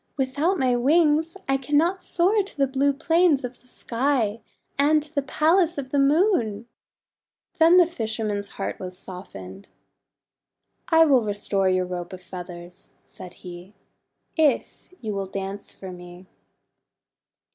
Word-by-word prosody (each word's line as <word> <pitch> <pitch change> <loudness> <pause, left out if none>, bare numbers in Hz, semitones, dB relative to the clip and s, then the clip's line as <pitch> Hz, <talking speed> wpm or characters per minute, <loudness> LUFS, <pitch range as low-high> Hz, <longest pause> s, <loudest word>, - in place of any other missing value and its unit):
Without 285 +8 0
my 255 -3 +2
wings 310 +5 +2
I 270 0 +2
cannot 300 +8 +1
soar 380 +6 +2
to 395 -3 -9
the 275 - +3
blue 270 +1 +1
plains 320 0 +2
of 250 0 -7
the 250 - -27
sky, 235 -3 -1 0.3
and 295 +2 +3
to 300 0 -13
the 285 - +1
Palace 325 +5 +2
of 260 -2 -5
the 285 - +2
Moon." 275 - +2 0.9
Then 330 +2 +7
the 355 - +7
fisherman's 220 -9 -3
heart 195 - -4
was 185 -1 -6
softened. 100 - -10 1.2
;<I 325 -1 +6
will 265 -6 +4
restore 200 -2 0
your 185 0 +1
Robe 180 0 -6
of 185 - -9
Feathers/' 175 0 -10
he - - -42
said, 180 +1 -10 0.6
"if 310 -3 +1
you 215 -3 -3
will 195 -1 -3
dance 195 +1 -5
for 190 -1 -9
me." 180 0 -12
255 Hz, 140 wpm, -24 LUFS, 195-310 Hz, 1.2 s, Then